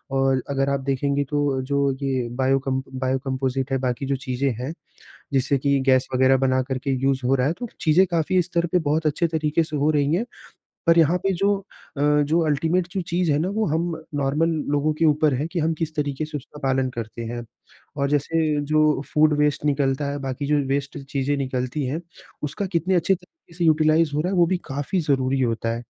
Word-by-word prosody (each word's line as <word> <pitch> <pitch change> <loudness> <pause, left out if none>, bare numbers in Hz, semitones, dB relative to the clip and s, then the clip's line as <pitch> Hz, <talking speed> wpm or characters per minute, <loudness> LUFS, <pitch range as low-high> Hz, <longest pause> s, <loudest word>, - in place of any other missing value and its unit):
और 135 -1 +2
अगर 135 0 0
आप 140 0 0
देखेंगे 140 +1 0
तो 145 -3 0
जो 140 +1 +1
ये 130 -3 -1
बायो 135 +1 +2
कम 130 0 0 0.2
बायो 130 0 0
कंपोज़िट 130 0 -2
है, 135 - +2
बाकी 130 +1 -2
जो 140 0 0
चीज़ें 135 0 -2
हैं, 130 +5 -4 0.6
जिससे 135 +1 +2
कि 140 +1 +1
गैस 130 -1 +4
वग़ैरह 130 +1 +4
बनाकर 130 0 0
के 135 - 0
यूज़ 135 0 +1
हो 130 +2 +3
रहा 130 0 +1
है, 155 - +1
तो 240 +7 -6
चीज़ें 165 +4 +4
काफ़ी 175 +2 +2
स्तर 170 -1 -1
पे 180 - +3
बहुत 155 +2 +1
अच्छे 155 +3 +1
तरीके 160 0 0
से 155 -1 -6
हो 145 +2 +2
रही 145 0 +1
हैं। 195 +8 +1 0.6
पर 165 0 +5
यहाँ 165 +2 +4
पे 195 +1 0
जो 200 +3 +2 0.4
अ, - - -4 0.2
जो 155 +3 +1
अल्टिमेट 160 +4 +1
जो 190 - -1
चीज़ 175 -1 +1
है 145 - +2
ना, 165 +4 0
वो 215 +3 0
हम 165 +3 0 0.2
नॉर्मल 145 +3 +1 0.2
लोगों 145 +1 +2
के - - +2
ऊपर 150 -2 +3
है 140 +4 -1
कि 180 - -1
हम 160 +1 +1
किस 160 -1 -3
तरीके 145 0 -1
से 150 0 -6
उसका 150 +2 -14
पालन 135 -1 +1
करते 115 -1 -6
हैं। 120 +1 -5 0.5
और 140 -1 0
जैसे 150 +1 +1
जो 155 -2 +3
फूड 155 -1 +4
वेस्ट 150 0 +1
निकलता 140 -1 +1
है, 145 - -3
बाकी 135 +1 -4
जो 150 +1 +2 0.2
वेस्ट 140 -1 -3
चीज़ें 140 +1 0
निकलती 130 +1 -2
हैं, 145 +6 -2 0.4
उसका 150 +8 -3
कितने 185 0 0
अच्छे 180 +2 +3
तरीके 180 - -17
से 175 - -1
यूटिलाइज़ 155 0 +4
हो 150 - +1
रहा 180 +4 -1
है, - - 0
वो 170 - +6
भी 185 +2 +1
काफ़ी 145 +7 -1
ज़रूरी 135 -3 +1
होता 115 -2 0
है। 120 - -8
145 Hz, 215 wpm, -23 LUFS, 135-160 Hz, 0.6 s, वो